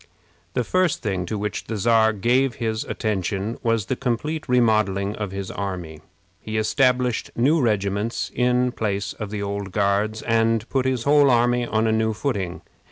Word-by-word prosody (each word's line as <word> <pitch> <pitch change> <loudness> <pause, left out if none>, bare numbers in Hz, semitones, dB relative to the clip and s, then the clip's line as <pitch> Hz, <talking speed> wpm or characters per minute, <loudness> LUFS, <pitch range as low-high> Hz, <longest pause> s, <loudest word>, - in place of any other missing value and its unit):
The 125 - +1
first 185 +3 +1
thing 95 -5 -2
to 110 - -3
which 105 +1 -3
the 110 - -4
Czar 110 +1 +4
gave 120 +4 +1
his 110 -1 -2
attention 100 0 -2
was 115 -4 +1
the 130 - -1
complete 150 +6 -2
remodeling 110 -5 +2
of 105 -2 -4
his 95 -1 -5
army. 90 -6 -5 0.4
He 110 +1 -4
established 125 +1 +1
new 145 +7 +3
regiments 105 -1 -1
in 125 0 +2
place 100 -4 -2
of 110 -2 -6
the 105 -1 -4
old 100 -1 -4
Guards, 105 +2 0
and 115 0 +1
put 130 -1 +1
his 130 -3 0
whole 145 0 +5
army 120 0 +2
on 110 0 +1
a 110 - +2
new 110 0 +1
footing. 100 -7 -3
110 Hz, 165 wpm, -23 LUFS, 100-125 Hz, 0.4 s, whole